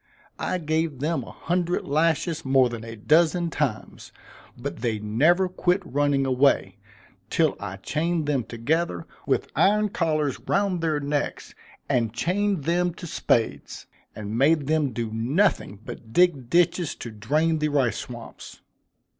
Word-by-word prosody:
I - - -1
gave 160 -2 -1
them 155 +4 -1
a - - -11
hundred 175 0 -1
lashes 165 +2 +1
more 130 -2 +4
than 115 -1 -6
a 115 0 -7
dozen 165 - +2
times; 135 -9 -3 0.5
but - - -5
they 115 -3 -1
never 145 - +2
quit 180 +1 0
running 145 -2 +1
away, 135 +1 +2 0.5
till - - +2
I 100 -1 -5
chained 160 - -1
them 140 -4 0
together, 115 - -1 0.2
with - - 0
iron 210 +1 +3
collars 155 - 0
round 195 -3 0
their 155 -2 0
necks, 145 0 -3 0.3
and 115 -3 +1
chained 185 - 0
them 175 +2 +1
to 175 - -8
spades, 115 -7 -1 0.3
and 105 0 -5
made 145 +4 +3
them 150 -2 +1
do 115 -1 -3
nothing 120 - +1
but 110 - -9
dig 160 -9 +3
ditches 175 0 +2
to 115 - -8
drain 155 +10 0
the 150 0 +1
rice 135 -5 +1
swamps. 120 -2 -9
150 Hz, 145 wpm, -25 LUFS, 120-170 Hz, 0.5 s, more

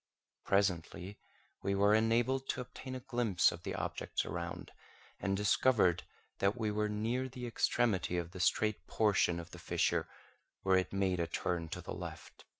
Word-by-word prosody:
Presently 95 0 0 0.4
we 100 - 0
were 100 +1 +4
enabled 120 +4 +2
to 125 - -1
obtain 130 +1 -8
a 130 - -5
glimpse 120 -8 +2
of 85 - -8
the - - -4
objects - - -2
around, 85 +1 -5 0.5
and 95 0 0
discovered 105 -4 +3 0.3
that 100 +4 +2
we 110 -2 0
were 105 0 0
near 115 +5 -1
the 125 0 -6
extremity 115 -6 +1
of 85 -1 -3
the 95 - -9
straight 100 0 +1
portion 100 -5 +2
of 85 - -9
the - - -10
fissure, - - +1 0.6
where 95 -1 +4
it 95 - 0
made 95 -2 +1
a 85 - 0
turn 85 0 -2
to - - -5
the - - -6
left. - - -8
100 Hz, 165 wpm, -34 LUFS, 90-115 Hz, 0.6 s, were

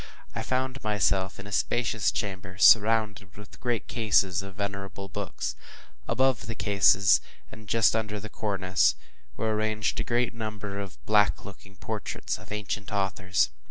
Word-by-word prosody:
I - - -3
found 130 +1 -2
myself 100 -2 +1
in 95 - -8
a 100 - -9
spacious 115 0 +1
chamber, 95 -3 -5
surrounded 105 -2 +4
with 105 -1 -13
great 120 -2 -1
cases 100 -5 +2
of 95 -1 -10
venerable 100 -1 -5
books. - - -4 0.5
Above 130 -4 +1
the 115 - -4
cases, 100 -1 +4 0.3
and 110 -1 -12
just 115 -1 +4
under 105 -2 -2
the 110 - -7
cornice, 100 -3 +1 0.4
were 110 -1 0
arranged 110 0 -1
a - - +1
great 120 +1 0
number 105 -3 -5
of 100 -1 -7
black 105 -1 +3
looking 100 -1 -12
portraits - - -4
of - - -14
ancient 105 -1 -4
authors. 95 -5 +1
105 Hz, 150 wpm, -27 LUFS, 100-110 Hz, 0.5 s, surrounded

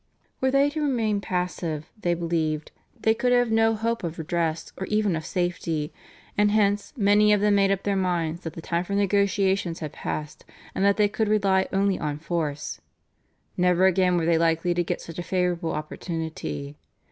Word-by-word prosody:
Were 260 - +3
they 275 +2 +3
to 310 +1 -3
remain 225 -8 0
passive, 180 -5 -3
they 175 -5 0
believed, 160 -3 -1 0.3
they 220 - +3
could 245 +2 0
have 245 -2 +3
no 225 0 +3
hope 230 +1 -2
of 170 -1 -4
redress 165 0 -2
or 190 - -5
even 210 -4 +1
of 160 - -4
safety, 170 -4 -2 0.4
and 210 0 +3
hence 205 -1 +1
many 210 0 +4
of 210 - +4
them 210 0 +3
made 200 -1 +4
up 195 -1 0
their 200 -1 0
minds 175 -3 -1
that 165 -3 -6
the 165 - -9
time 170 +1 -1
for 200 - -5
negotiations 195 -3 +1
had 155 -2 -6
passed, 150 -1 -5 0.3
and 190 - -1
that 200 0 +4
they 210 -1 +4
could 215 +1 -1
rely 195 -3 +2
only 195 0 +1
on 150 -1 -2
force. 155 -3 -3 0.7
Never 180 0 +3
again 185 -1 +3
were 165 - 0
they 165 -1 +3
likely 165 +1 +2
to 175 0 +1
get - - -3
such 165 +1 -8
a - - -1
favourable 175 -2 -1
opportunity. 150 - -5
180 Hz, 185 wpm, -25 LUFS, 165-205 Hz, 0.7 s, many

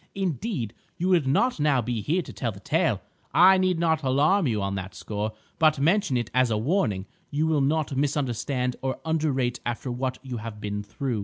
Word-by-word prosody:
Indeed, 180 - -2 0.2
you 180 +2 0
would 170 -7 +3
not 240 - +2
now 145 -3 +3
be 120 -1 -2
here 165 - 0
to - - -10
tell 120 -4 -2
the 100 - -11
tale. 100 - +1 0.3
I 185 +2 +7
need 185 -2 +2
not 160 -2 +2
alarm 150 +7 +3
you 110 -4 0
on 100 0 -1
that 95 -1 -5
score, 105 +1 -3 0.3
but 155 -1 +4
mention 165 -1 +2
it 120 -3 -3
as 130 -1 +3
a 110 - +1
warning 110 - 0 0.2
you 150 +2 0
will 155 -3 +2
not 145 0 +1
misunderstand 130 -2 -1
or 130 0 -2
underrate 145 -6 0
after 120 +2 -3
what 130 +1 -2
you 130 -2 -5
have 110 -1 -7
been 105 0 -3
through. 110 +3 -3
135 Hz, 200 wpm, -26 LUFS, 115-160 Hz, 0.3 s, I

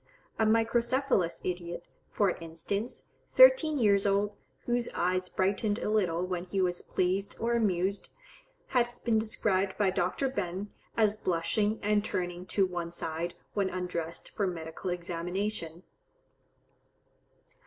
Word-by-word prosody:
A 220 - +4
microcephalous 230 -3 +2
idiot, 175 -1 -4 0.3
for 200 -3 +2
instance, 175 +8 -4 0.2
thirteen - - +6
years 205 -4 +4
old, 200 +1 +1 0.3
whose 240 0 0
eyes 185 +1 0
brightened 205 +2 +1
a 210 - -2
little 180 -5 +1
when 180 -1 -3
he 190 +2 -2
was 180 -1 +1
pleased 185 +2 -1
or 235 +1 +1
amused, 200 -3 +1 0.6
has 240 -1 +1
been 225 -2 +1
described 200 -3 0
by 200 -3 +3
Dr. 185 +9 0
Behn, 195 -5 -3 0.3
as 215 -2 +3
blushing 205 +5 0
and 210 0 +2
turning 180 -3 -3
to 195 - +2
one 175 -2 -3
side, 170 0 -4 0.2
when 200 -2 +1
undressed 170 -3 -4
for 200 - -1
medical 165 0 -5
examination. 175 0 -3
190 Hz, 125 wpm, -30 LUFS, 175-215 Hz, 0.6 s, thirteen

